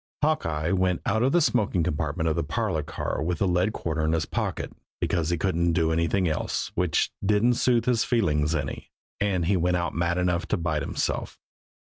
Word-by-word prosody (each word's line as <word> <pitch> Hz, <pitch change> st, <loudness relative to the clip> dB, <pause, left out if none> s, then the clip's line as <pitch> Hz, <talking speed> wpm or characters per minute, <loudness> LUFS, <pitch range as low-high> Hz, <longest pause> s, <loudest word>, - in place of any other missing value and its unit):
Hawkeye 80 Hz, -, 0 dB
went 95 Hz, -2 st, +1 dB
out 110 Hz, +2 st, +1 dB
of 130 Hz, +2 st, +3 dB
the 175 Hz, -, +4 dB
smoking 105 Hz, -, +2 dB
compartment 80 Hz, +2 st, -1 dB
of 80 Hz, -, +1 dB
the -, -, 0 dB
parlor -, -, -1 dB
car -, -, -4 dB
with 85 Hz, +2 st, -1 dB
the 100 Hz, -, +1 dB
lead 90 Hz, +3 st, +2 dB
quarter 80 Hz, -6 st, -2 dB
in 80 Hz, +1 st, +1 dB
his 80 Hz, -2 st, 0 dB
pocket -, -, -3 dB, 0.3 s
because 85 Hz, -2 st, 0 dB
he 85 Hz, -, +1 dB
couldn't 85 Hz, -1 st, +1 dB
do 80 Hz, -1 st, +2 dB
anything 85 Hz, +3 st, +1 dB
else 80 Hz, -1 st, -2 dB
which 90 Hz, -4 st, +1 dB
didn't 105 Hz, +4 st, +3 dB
soothe 120 Hz, 0 st, +2 dB
his 120 Hz, -3 st, +2 dB
feelings 80 Hz, -, +1 dB
any 75 Hz, -, -4 dB, 0.3 s
and 95 Hz, -4 st, +1 dB
he 95 Hz, +3 st, +2 dB
went 90 Hz, 0 st, +2 dB
out 85 Hz, -1 st, -2 dB
mad 85 Hz, +1 st, 0 dB
enough 90 Hz, -1 st, 0 dB
to -, -, 0 dB
bite 80 Hz, -3 st, -1 dB
himself. -, -, -2 dB
85 Hz, 195 wpm, -26 LUFS, 80-100 Hz, 0.3 s, the